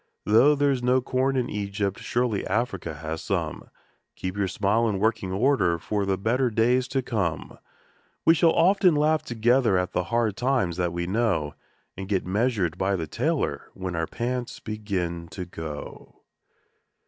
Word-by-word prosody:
Though 120 +8 +5
there 145 0 +2
is 130 -2 -1
no 125 +1 +3
corn 130 +2 0
in 125 -1 0
Egypt, 100 -2 -3
surely 120 -4 -1
Africa 95 - -2
has 80 +1 -5
some - - -3 0.5
Keep 95 +1 -4
your 100 -1 0
smile 110 +4 +1
in 100 - -1
working 110 -2 0
order 95 -5 +2
for 100 +4 -2
the 95 -1 +1
better 120 +6 +1
days 120 +3 +2
to 135 0 -1
come! 100 -10 -3 0.7
We 165 - +7
shall 165 +1 +4
often 180 0 +4
laugh 155 +1 +2
together 120 -4 +2
at 90 0 -1
the 90 - -1
hard 115 0 0
times 125 -8 0
that 90 -1 0
we 85 0 -3
know, 95 -7 0 0.4
And 95 +1 -7
get 95 -3 0
measured 100 -4 0
by 95 +1 +1
the 85 -3 -3
tailor 75 - -2
when 95 -2 -4
our 80 0 -1
pants 125 +1 -3
begin 95 -6 -3
to 90 +2 -6
go. 80 -4 -9
105 Hz, 165 wpm, -25 LUFS, 90-125 Hz, 0.7 s, We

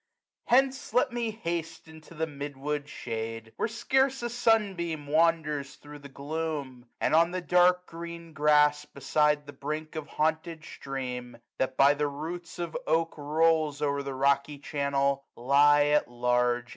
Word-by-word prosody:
Hence, 265 0 +2
let 255 +1 +3
me 240 -1 -2
haste 170 -7 -5
into 160 +1 -14
the 160 +1 -1
mid 145 -2 -7
wood 145 +1 -3
^hade. 115 -3 -6
Where - - 0
scarce 265 +3 +1
a 240 - -2
sun 225 -4 +2
beam 165 -4 -4
wanders 150 -2 +1
thro* 145 0 -12
the 140 0 -12
gloom; 140 -3 -5 0.2
10 - - +1
And - - +1
on 165 +1 +5
the 185 +1 -3
dark 180 0 +3
green 170 -1 -9
grass, 150 0 +4
beside 150 +1 0
the 145 - -10
brink 155 +3 -5
Of 155 -2 -5
haunted 160 +1 -2
stream, 125 -4 -6 0.2
that 130 0 -1
by 140 +1 +6
the 145 0 -1
roots 165 +4 -6
of 170 -2 -5
oak 165 0 +1
Rolls 155 0 +1
o*er 140 -1 0
the 140 -1 -5
rocky 140 +2 +1
channel, 140 -1 -1
lie 145 +4 +5
at 150 -2 +2
large. 125 0 0
150 Hz, 160 wpm, -28 LUFS, 140-165 Hz, 0.2 s, by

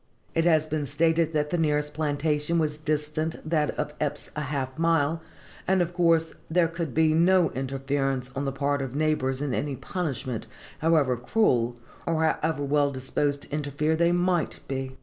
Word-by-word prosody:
It 165 0 +1
has 160 -3 +4
been 155 -2 -2
stated 160 +3 +2
that 150 -1 0
the 175 - +1
nearest 150 -1 +1
plantation 150 +1 0
was 155 -2 0
distant 155 +1 -1
from 155 - -9
that 150 -3 +1
of 150 0 -2
Eppes 145 -1 -3
a 150 - -2
half 135 -2 -3
mile, 165 -1 +2 0.5
and 190 0 +3
of 175 0 0
course 165 -2 +3 0.2
there 170 +1 +3
could 165 -4 -4
be 160 0 +4
no 175 0 +4
interference 135 0 -2
on 140 +1 -2
the 135 - 0
part 140 +1 0
of 135 -1 -5
neighbors 145 -3 0
in 140 -3 -1
any 145 +1 -1
punishment, 130 - -4 0.3
however 155 -5 +3
cruel, 125 - +1 0.3
or 160 -1 +1
how 160 - +2
ever 155 -2 0
well 145 0 +2
disposed 140 +2 -1
to - - -15
interfere 150 +1 0
they 170 +1 +3
might 175 -2 +1
be. 130 -1 -4
150 Hz, 180 wpm, -26 LUFS, 140-165 Hz, 0.5 s, has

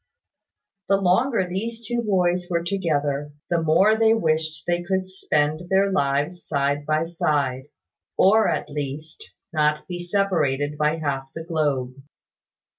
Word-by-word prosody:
The 195 - +5
longer 195 +3 +2
these 225 +6 -4
two 240 +2 -1
boys 180 -4 +1
were 170 -1 0
together, 150 -6 -1 0.2
the 170 -1 +2
more 185 +7 +4
they 225 0 +4
wished 155 -5 -1
they 175 0 0
could 185 +1 -1
spend 155 -2 -1
their 195 +1 +3
lives 145 +1 0
side 145 0 -1
by 155 +1 +2
side; 145 -5 -1 0.5
or, 215 +3 +5
at - - -1
least, 150 +2 -6 0.2
not 150 -1 +1
be 175 -1 -5
separated 165 -7 0
by 150 +1 +1
half 135 -4 -3
the 165 - -5
globe. 145 -6 -1
165 Hz, 135 wpm, -23 LUFS, 145-190 Hz, 0.5 s, The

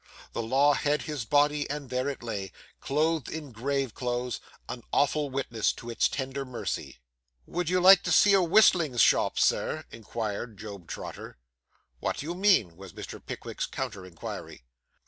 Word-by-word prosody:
The - - -2
law 135 +6 +4
had 145 +2 0
his 150 -6 -4
body; 145 +3 +2
and 145 -3 -5
there 130 +2 0
it 135 -4 -6
lay, 100 -5 -4 0.3
clothed 155 -1 0
in 155 -4 -6
grave 135 +1 -2
clothes, 125 0 -3 0.3
an 125 - -6
awful 145 +1 +2
witness 130 -5 0
to 120 - -8
its 115 - +2
tender 135 0 -3
mercy. 125 -3 -5 0.5
'Would 175 -1 -2
you 185 0 +3
like 185 +1 +8
to 175 - 0
see 200 +4 +6
a 195 - +6
whistling 170 - +4
shop, - - +4
Sir?' - - +1
inquired 110 0 -5
Job 100 -4 -9
Trotter. - - -7 0.6
'What - - -2
do - - -5
you 170 - -3
mean?' 180 - +3
was 95 -3 -11
Mr. - - -8
Pickwick's - - -5
counter 95 - -5
inquiry. 85 -7 -8
135 Hz, 165 wpm, -28 LUFS, 115-150 Hz, 0.6 s, like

